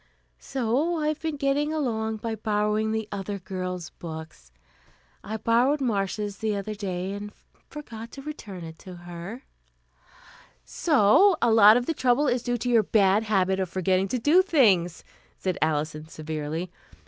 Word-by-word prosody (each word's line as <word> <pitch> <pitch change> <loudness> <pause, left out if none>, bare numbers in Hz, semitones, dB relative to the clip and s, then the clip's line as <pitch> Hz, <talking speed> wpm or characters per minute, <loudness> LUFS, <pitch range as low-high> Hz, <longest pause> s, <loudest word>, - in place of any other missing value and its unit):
So 270 +7 -1
I've 305 -1 -1
been 320 -2 -2
getting 280 +2 0
along 220 -8 -1
by 225 +1 -4
borrowing 215 0 0
the 220 -1 -2
other 200 0 -4
girls' 180 -2 -5
books. 160 - -9 0.7
I 220 +2 -4
borrowed 245 +7 +2
Marcia's 205 -4 -2
the 220 -2 -1
other 200 +2 -4
day, 190 -2 -4
and 205 +1 -6 0.4
forgot 230 -6 -8
to 275 - -9
return 210 - -8
it 160 0 -10
to 185 -1 -10
her 175 +8 -8 0.6
" - - -23 0.2
"So 315 - +4
a 235 - +3
lot 220 0 +8
of 245 - -1
the 325 - -1
trouble 260 0 +2
is 245 -1 +1
due 245 0 -1
to 245 +2 -3
your 230 -2 +5
bad 200 0 +3
habit 190 -3 +1
of 190 -2 -1
forgetting 185 +1 +1
to 250 - -1
do 300 +10 +5
things," 200 - +2 0.3
said 185 -2 -2
Alison 155 0 -1
severely. 155 +2 -5
215 Hz, 160 wpm, -26 LUFS, 185-250 Hz, 0.7 s, lot